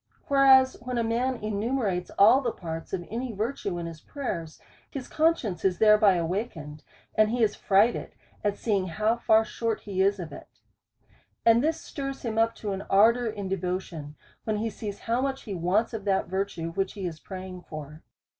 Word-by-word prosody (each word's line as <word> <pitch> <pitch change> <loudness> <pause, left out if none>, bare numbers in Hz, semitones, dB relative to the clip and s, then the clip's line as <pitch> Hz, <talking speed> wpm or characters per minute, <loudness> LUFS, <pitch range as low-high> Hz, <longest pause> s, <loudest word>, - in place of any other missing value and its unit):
Whereas 265 -2 +6
when 250 0 -4
a 235 - +1
man 240 +3 0
enumerates 215 -3 -1
all 220 +7 +7
the 240 -3 -1
parts 165 -4 -7
of 175 -2 -3
any 240 +2 -3
virtue 205 -3 -3
in 170 - -4
his 165 -2 -8
prayers, 170 - -5 0.3
his 265 -3 -6
conscience 305 - +1
is 185 -2 +2
thereby 210 -2 +6
awakened, 165 -4 -3 0.3
and 215 0 +4
he 240 +1 +1
is 210 - +3
frightened 205 +4 +2 0.3
at 205 -1 0
seeing 200 -5 0
how 215 +6 +1
far 220 -1 +4
short 225 -1 -2
he 190 -2 -2
is 200 +1 +3
of 170 -3 -6
it. - - -10 1.0
And 230 +2 +6
this 320 +1 +1
stirs 275 -1 -6
him 225 -1 -1
up 225 0 +2
to 210 - -4
an 195 0 -3
ar 210 +4 +6
dour 245 0 -3
in 205 -3 -4
devotion, 180 -5 -4 0.3
when 215 -1 -1
he 225 +1 -2
sees 205 -1 -6
how 235 +2 0
much 270 0 -2
he 210 - -5
wants 190 +7 +1
of 220 -3 -4
that 195 -1 +2
virtue 185 -3 -3
which 195 +2 -2
he 195 -3 -5
is 165 -3 -5
praying 185 0 -8
for. 155 0 -8
210 Hz, 190 wpm, -27 LUFS, 185-235 Hz, 1.0 s, all